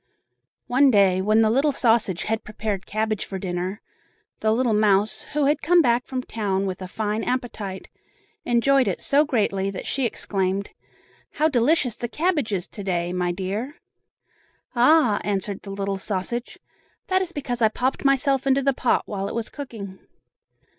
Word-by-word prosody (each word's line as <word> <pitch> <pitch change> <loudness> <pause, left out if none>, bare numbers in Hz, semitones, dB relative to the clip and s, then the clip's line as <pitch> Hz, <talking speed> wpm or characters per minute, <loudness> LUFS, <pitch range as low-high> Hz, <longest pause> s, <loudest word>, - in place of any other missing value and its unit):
One 270 +3 +4
day, 195 -5 +4
when 215 +3 +3
the 220 - +4
little 275 +5 +3
sausage 225 -8 +1
had 220 0 -2
prepared 215 -3 -4
cabbage 215 -1 -1
for 195 - -6
dinner, 185 +2 -4 0.6
the 215 - +1
little 235 0 +2
mouse, 210 0 +2
who 295 -1 +2
had 295 +1 +2
come 350 +2 +4
back 245 -5 +2
from 255 -1 -3
town 200 -4 -2
with 190 -1 -4
a 185 - -5
fine 215 +3 -2
appetite, 220 -6 -4 0.6
enjoyed 255 +2 +3
it 190 - -1
so 285 +2 +3
greatly 200 -7 0
that 195 - -6
she 270 -3 0
exclaimed: 195 -2 -2 0.6
"How 310 +1 +2
delicious 255 -1 +2
the 240 - -4
cabbage 300 -4 0
is 185 -3 -2
to 205 - -8
day, 175 -2 -1
my 180 -1 0
dear!" 200 - -4 1.0
"Ah!" 245 -3 +4
answered 200 0 -2
the 200 - -10
little 195 0 -3
sausage, 210 +5 -4 0.5
"that 375 0 +1
is 365 -2 -3
because 260 -6 -3
I 220 - +6
popped 255 +4 -2
myself 275 -1 +2
into 270 0 +3
the 275 0 +2
pot 250 - +1
while 195 -1 -4
it - - -5
was 230 -2 -3
cooking." 215 -9 -8
220 Hz, 165 wpm, -24 LUFS, 195-260 Hz, 1.0 s, I